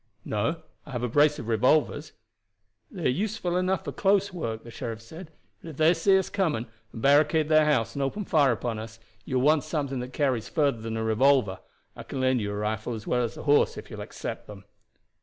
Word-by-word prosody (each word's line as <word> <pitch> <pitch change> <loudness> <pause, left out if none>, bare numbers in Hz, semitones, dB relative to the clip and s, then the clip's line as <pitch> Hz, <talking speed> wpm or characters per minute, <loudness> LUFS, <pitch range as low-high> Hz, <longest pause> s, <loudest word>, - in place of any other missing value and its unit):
"No; 145 +11 -2 0.2
I 145 - -11
have 120 -1 -3
a - - +1
brace 145 +5 +3
of 115 - -7
revolvers." 145 +6 +1 0.8
"They 180 -5 -7
are - - +5
useful 185 - -1
enough 185 0 0
for - - -3
close 200 0 +1
work," 115 -10 -4
the 115 - -11
sheriff 115 -1 -5
said, 160 +10 -11 0.3
"but 165 - -9
if 150 - -10
they 160 +2 +5
see 190 +4 +3
us 190 - 0
coming, 160 - -1 0.3
and 115 - -8
barricade 150 +2 +4
their 155 -1 +5
house 115 -7 +1
and 140 - -3
open 165 +10 -2
fire 145 -7 +3
upon 115 -1 -3
us, 110 +1 -9 0.3
you 130 - -1
will 125 - +1
want 150 -1 +4
something 145 -4 -3
that 125 +1 -6
carries 130 -5 -1
further 140 -7 +1
than 115 0 -4
a 110 - -2
revolver. 110 -3 +2 0.4
I - - -8
can 135 - -6
lend 130 -2 +2
you 100 -1 -3
a - - -4
rifle 110 +3 -2
as 110 - -8
well 125 - +1
as 115 - -4
a - - -7
horse 145 0 +3
if - - -9
you - - -7
will - - -5
accept - - -7
them." 100 -1 -11
135 Hz, 230 wpm, -27 LUFS, 115-155 Hz, 0.8 s, are